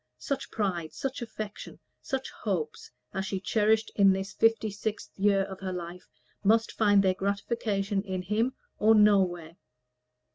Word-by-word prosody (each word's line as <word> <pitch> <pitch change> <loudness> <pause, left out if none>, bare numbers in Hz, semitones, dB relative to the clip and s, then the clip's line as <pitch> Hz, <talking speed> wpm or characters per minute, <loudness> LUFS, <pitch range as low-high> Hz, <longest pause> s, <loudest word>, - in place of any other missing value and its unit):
Such 275 -1 -3
pride, 180 -7 -2
such 270 -1 -4
affection, 215 -3 -7 0.2
such 265 0 -3
hopes 170 -8 -3 0.2
as 190 -1 -2
she 195 - -2
cherished 220 +2 +2
in 195 -1 +6
this 195 +1 -4
fifty 225 -1 +2
sixth 210 +1 -4
year 200 -1 +3
of 190 -1 -7
her 190 -1 -4
life, 180 0 -7 0.4
must 225 +3 +3
find 205 -2 +4
their 190 -1 +3
gratification 200 0 -1
in 190 -2 -4
him 220 +7 0 0.2
or 220 +1 +5
nowhere. 185 -6 +3
200 Hz, 145 wpm, -28 LUFS, 190-220 Hz, 0.4 s, in